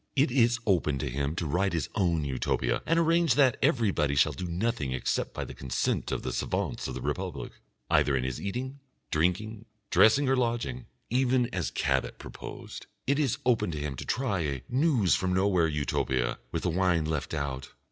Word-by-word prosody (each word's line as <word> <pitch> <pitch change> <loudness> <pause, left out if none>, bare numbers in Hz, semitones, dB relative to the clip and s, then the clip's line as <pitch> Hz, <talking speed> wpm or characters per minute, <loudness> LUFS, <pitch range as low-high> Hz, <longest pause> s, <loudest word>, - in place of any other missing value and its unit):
It 140 0 +3
is 120 -2 +4
open 85 -8 +2
to - - -3
him 70 +4 -2
to 85 - -2
write 90 +6 0
his 80 -4 -1
own 85 -6 +1
Utopia 65 -2 0
and 165 - +3
arrange 165 -4 +3
that 130 -4 +4
everybody 90 - +2
shall 75 +3 +4
do 80 +6 -5
nothing 85 - -1
except 65 - -1
by - - -4
the - - -8
consent 65 -3 -1
of - - -2
the - - -3
savants - - -2
of - - -5
the - - -5
Republic, - - -3 0.4
either 70 -2 +3
in 65 - -1
his 65 -1 -3
eating, 130 +7 -4 0.3
drinking, 100 +7 0 0.3
dressing 135 +6 +5
or 135 - +3
lodging, 120 -1 -1 0.2
even 125 -1 +2
as 90 -3 -1
Cabet - - -1
proposed. - - -9 0.2
It 140 +2 +1
is 140 -6 +1
open 120 -7 +2
to 75 -3 -4
him 75 -2 -3
to - - -5
try 125 -7 -1
a 70 -6 -2
News 130 - +2
from 90 -1 +1
Nowhere 95 -3 +3
Utopia 65 -4 -1
with 80 - -2
the 90 - +1
wine 90 -2 +2
left 80 -1 -2
out. 70 -3 -3
90 Hz, 190 wpm, -28 LUFS, 75-120 Hz, 0.4 s, dressing